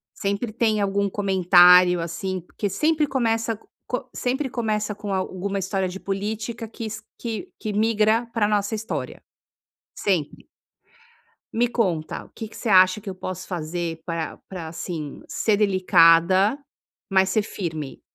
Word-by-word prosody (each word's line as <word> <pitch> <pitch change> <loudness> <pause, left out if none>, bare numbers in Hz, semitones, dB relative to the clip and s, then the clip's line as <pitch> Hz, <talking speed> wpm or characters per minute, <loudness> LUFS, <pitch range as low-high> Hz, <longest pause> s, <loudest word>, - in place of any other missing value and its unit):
Sempre 200 +3 -2
tem 220 -2 +1
algum 200 0 +1
comentário, 180 -2 +6
assim, 180 +3 -3
porque 200 +4 -4
sempre 305 - +2
começa 230 -4 0
co - - -26 0.2
co 250 +1 -2
sempre 265 +2 -1
começa 215 -3 -1
com 205 -1 -6
alguma 190 +1 -2
história 190 0 -1
de 190 +2 -7
política 220 +4 -4
que 225 0 -6
se 220 0 -6 0.2
que 235 - -5
que 215 -2 -4
migra 220 +2 +2
pra 215 -3 +2
nossa 205 +1 0
história, 220 +1 -5 0.8
sempre. 180 -8 -1 1.1
Me 240 +2 +2
conta 180 -10 -1
o - - -19
que 220 - -6
que - - -15
você - - -5
acha 185 +1 +6
que 200 - -8
eu 190 - -6
posso 185 0 -6
fazer 170 -1 -4
pra 165 -2 -4
pra 180 -4 -6
assim, 160 -2 -6
ser 215 - +1
delicada, 185 +1 +5 0.5
mas 190 -1 +3
ser 215 - +2
firme? 160 -9 -5
200 Hz, 150 wpm, -24 LUFS, 180-220 Hz, 1.1 s, comentário